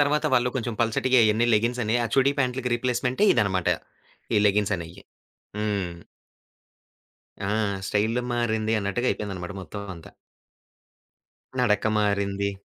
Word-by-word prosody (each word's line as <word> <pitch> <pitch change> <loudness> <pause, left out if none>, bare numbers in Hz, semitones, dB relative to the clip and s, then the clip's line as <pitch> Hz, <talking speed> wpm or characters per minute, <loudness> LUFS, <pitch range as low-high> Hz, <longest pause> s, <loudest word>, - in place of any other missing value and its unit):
తర్వాత 150 +2 +2
వాళ్ళు 125 0 +3
కొంచెం 120 -2 -2
పల్చటియె 125 +3 +2
అయన్నీ 110 +2 +3
లెగిన్స్ 120 +3 +1
అని 110 +3 +1
ఆ - - 0
చుడీ 135 +1 +4
ప్యాంట్లకి 125 -1 0
రిప్లేస్‌మెంటే 125 - 0
ఇదన్నమాట. 95 -3 +1 0.7
ఈ - - +5
లెగిన్స్ 105 0 +2
అనేయి. 85 +3 -9 0.6
హ్మ్. 100 -4 -1 1.5
ఆ! - - -1 0.4
'స్టైలు 110 +4 0
మారింది' 110 -2 0
అన్నట్టుగా 100 +5 -1
అయిపోయిందినమాట 95 -3 -4
మొత్తం 100 +5 -7
అంతా. 85 -2 -13 1.5
'నడక 120 -5 +2
మారింది.' 100 -1 0
110 Hz, 120 wpm, -25 LUFS, 100-125 Hz, 1.5 s, ఈ